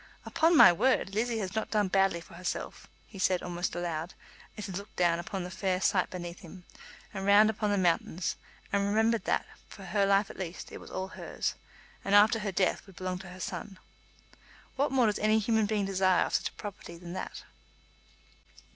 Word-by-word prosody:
"Upon 325 +1 +3
my - - +9
word, 195 0 +1
Lizzie 230 +2 0
has 195 -3 -3
not 220 - -2
done 210 -2 +1
badly 195 -2 +2
for - - -16
herself," 180 +1 -5 0.2
he 195 - -12
said 185 -1 +1
almost 175 -1 -3
aloud, 170 -1 -3 0.4
as 210 - -5
he 195 - -6
looked 200 +3 -7
down 170 -1 +2
upon 185 +2 -4
the 180 - -7
fair 185 0 -1
sight 185 -1 +2
beneath 175 -1 -7
him, 180 +2 -12 0.5
and 195 -1 -4
round 205 +2 +6
upon 210 -1 -2
the 205 - +1
mountains, 175 -1 0 0.4
and 200 0 +2
remembered 220 +2 +2
that, - - +1 0.2
for 200 - -11
her 200 +1 +1
life 200 +1 +3
at - - -13
least, 180 -2 -6
it - - -8
was - - -12
all 190 0 -4
hers, - - -4 0.5
and 200 - +2
after 215 +2 +6
her 210 -2 -3
death 185 +1 0
would 195 - -15
belong 185 -1 -4
to 190 -1 -10
her 180 +1 -11
son. 195 +1 -6 1.0
What 280 +1 +1
more 260 -3 +3
does 210 -2 +1
any 215 +1 +3
human 220 0 +2
being 205 -1 0
desire 190 -1 +2
of - - -6
such - - +1
a - - -24
property 195 -4 -8
than 175 0 -9
that? - - -6
195 Hz, 200 wpm, -30 LUFS, 180-210 Hz, 1.0 s, my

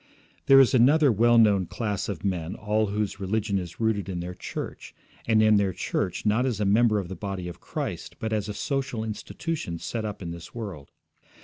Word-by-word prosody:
There 135 0 +8
is 135 - +5
another 140 +4 +5
well 120 +2 +4
known 100 -5 +4
class 105 -6 -3
of 100 - -5
men 90 -2 -2
all 110 +1 0
whose 105 0 -2
religion 100 +1 0
is 85 -2 -8
rooted 110 -4 0
in 90 -2 -3
their 90 +1 -5
church, - - -7 0.3
and 110 -1 +4
in 110 -1 +5
their 100 -2 +1
church 90 +3 -2
not 110 +4 +3
as 125 -5 -1
a 105 - +1
member 105 +2 +4
of 95 -4 -2
the 95 - -6
body 95 -3 -5
of 85 - -9
Christ, - - -5
but 110 0 -3
as 105 -1 -1
a - - -3
social 135 -4 -2
institution 110 - -4
set 110 +6 -4
up 105 -2 -5
in 85 - -5
this 85 +5 -10
world. 95 -12 -7
105 Hz, 205 wpm, -26 LUFS, 95-115 Hz, 0.3 s, There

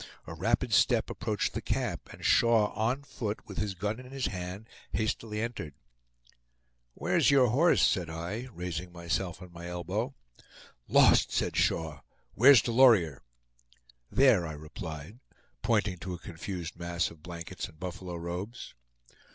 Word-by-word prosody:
A - - -7
rapid - - 0
step - - +3
approached - - -2
the - - -3
camp, - - -2
and - - -10
Shaw 115 -3 +4
on 120 +6 0
foot, 110 -6 -5
with 100 - -5
his 105 -3 -2
gun 105 +5 -2
in 130 0 -11
his 135 -1 -2
hand, 90 +3 -5 0.3
hastily 110 0 -2
entered. 110 - -5 1.2
"Where's - - +2
your 135 -4 +5
horse?" 155 +10 +4
said 90 -3 +1
I, 85 +10 -5
raising 90 -1 -5
myself 85 +1 -3
on 90 -1 -13
my 85 0 -8
elbow. 95 +9 -3 0.7
"Lost!" - - +5
said - - 0
Shaw. 80 -3 0 0.3
"Where's 130 -1 +7
Delorier?" 115 - +5 0.9
"There," 125 -11 +4
I 80 - -5
replied, 80 +5 -8 0.4
pointing 105 -5 +1
to 90 -1 -5
a - - -7
confused 85 0 -7
mass 85 0 -1
of 80 -2 -15
blankets 85 0 -6
and 80 - -18
buffalo 90 0 -6
robes. 90 +8 -6
95 Hz, 145 wpm, -30 LUFS, 85-115 Hz, 1.2 s, Where's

